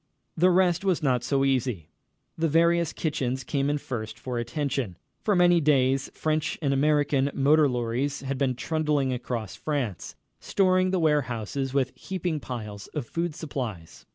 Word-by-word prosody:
The 180 +3 +4
rest 180 -1 +3
was 185 -4 +1
not 125 -4 +2
so 135 0 +1
easy. 125 - -1 0.4
The 165 0 +1
various 170 +1 +3
kitchens 130 -5 -2
came 140 0 0
in 145 - +1
first 110 -6 -5
for 125 -2 -4
attention. 120 - -2 0.3
For 210 - +2
many 175 -1 +5
days 135 -2 +2
French 155 -1 -1
and 140 -4 0
American 145 -1 +2
motor 145 +2 +4
lorries 125 +3 -1
had 135 0 -3
been 130 -3 +1
trundling 150 -1 0
across 120 -4 -4
France, 130 - -3 0.2
storing 185 -1 +2
the 190 - +1
warehouses 135 -4 0
with 135 -2 +2
heaping 180 -4 -3
piles 105 -6 -7
of 145 -5 -2
food 170 +2 -3
supplies. 120 - -6
140 Hz, 155 wpm, -26 LUFS, 125-160 Hz, 0.4 s, many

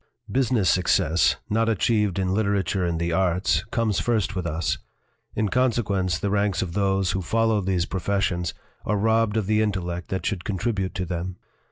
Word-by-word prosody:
" 115 -3 -15
Business 115 -6 +1
success 85 -2 +3
not 115 +2 +1
achieved 105 -2 +1
in 95 -1 0
literature 100 -2 0
and 85 -2 -1
the 85 0 -1
arts 90 -3 +1
comes 115 -4 0
first 110 -4 0
with 90 -2 -2
us; 85 +1 -1 0.6
in 110 0 +1
consequence, 105 -8 +1
the 100 +2 -2
ranks 100 -2 +1
of 85 -2 -6
those 95 -1 +1
who 95 - -1
follow 110 +3 +1
these 90 -2 0
professions 95 -2 -1 0.3
are 105 - 0
robbed 110 +1 +2
of 110 - 0
the 110 +2 +2
intellect 90 -4 -2
that 95 - -3
should 95 -5 -2
contribute 100 -1 -2
to 90 - -2
them. 90 +1 -4
95 Hz, 175 wpm, -24 LUFS, 90-110 Hz, 0.6 s, success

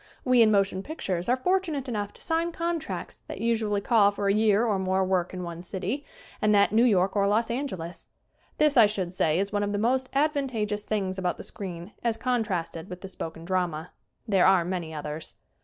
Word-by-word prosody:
We, 255 -2 +5
in 220 - +6
motion 195 -2 +2
pictures, 195 - -3
are 250 - +3
fortunate 330 -3 0
enough 210 -4 -3
to - - -14
sign 330 +1 0
contracts 335 0 -4
that - - -7
usually 220 -3 0
call 210 -2 +4
for 205 0 -2
a 200 - +4
year 215 +1 +3
or 205 -4 +1
more 190 0 +1
work 185 -2 0
in 185 -1 -5
one 170 -1 -6
city 195 +10 -4 0.4
and 210 0 +4
that 200 0 +4
New 225 +3 +4
York 195 -4 +3
or 200 -1 +3
Los 225 +3 +1
Angeles. 190 - -4 0.5
This, 300 -3 +3
I 225 -3 +8
should 190 -4 -3
say, 160 -3 +2
is 200 +2 0
one 205 - +1
of 205 0 -1
the - - 0
most 255 +4 +1
advantageous 265 -8 0
things 195 -3 -2
about 180 -2 -1
the - - -8
screen 180 -1 -7
as 230 -2 +1
contrasted 195 -9 -2
with 180 0 -8
the 195 - -6
spoken 165 -3 -7
drama. 175 -3 -1 0.4
There 195 -4 +4
are 190 -3 +4
many 175 -3 -3
others. 150 0 -6
205 Hz, 205 wpm, -27 LUFS, 185-235 Hz, 0.5 s, I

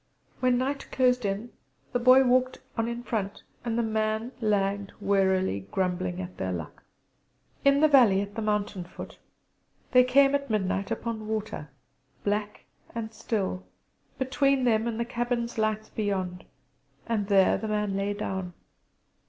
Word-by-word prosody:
When 250 -1 +3
night 275 +2 -2
closed 250 -2 +2
in 200 +4 -2 0.4
the 245 - +2
Boy 255 +2 +7
walked 255 0 +2 0.2
on 230 -1 0
in 235 0 -4
front, 205 -4 -3 0.2
and 230 -1 -1
the 235 - +2
man 220 +1 -1
lagged 200 -2 0
wearily, 190 - +1
grumbling 185 -1 -1
at 185 -1 -7
their 95 - -2
luck. 85 -3 -6 0.8
In 280 +1 +5
the 310 - +7
valley 245 -10 +6
at 200 0 -6
the 225 - -4
mountain 210 -3 -1
foot 175 - -10 0.7
they 250 0 +7
came 275 +2 +5
at 280 -1 0
midnight 195 -2 0
upon 220 -2 -3
water, 215 -8 -4 0.5
black 210 0 -2 0.3
and 225 -1 -4
still, 205 -4 -2 0.5
between 265 +1 +2
them 225 -2 +2
and 230 -1 -3
the 235 - 0
cabin's 240 -1 -2
lights 215 0 0
beyond; 190 -4 -2 0.6
and 215 -4 -1
there 195 -2 +5
the 220 - -4
man 210 -2 -1
lay 200 +1 -1
down. 190 -3 -4
215 Hz, 150 wpm, -27 LUFS, 195-245 Hz, 0.8 s, Boy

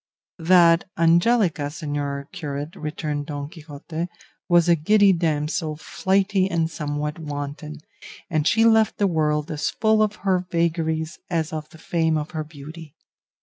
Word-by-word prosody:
"That 170 0 +5
Angelica, 170 -1 +3
señor 145 -2 -4
curate," 150 -2 -5
returned 150 -3 -4
Don 145 -1 -4
Quixote, 160 +1 -6 0.4
"was 175 -1 +5
a 170 - +5
giddy 200 +5 +4
damsel, 155 -1 -1
flighty 190 +3 +1
and 165 -2 0
somewhat 150 0 -3
wanton, 150 0 -6 0.5
and 155 -2 0
she 225 +1 +4
left 220 -2 +4
the 205 - +2
world 155 -2 0
as 145 -1 -1
full 220 0 +2
of 210 -1 +1
her 185 -2 +2
vagaries 160 -1 -1
as 160 -3 -1
of 155 -1 -5
the 160 - -15
fame 160 -1 0
of 150 0 -4
her 155 -2 -3
beauty. 155 +1 -11
160 Hz, 145 wpm, -23 LUFS, 150-175 Hz, 0.5 s, That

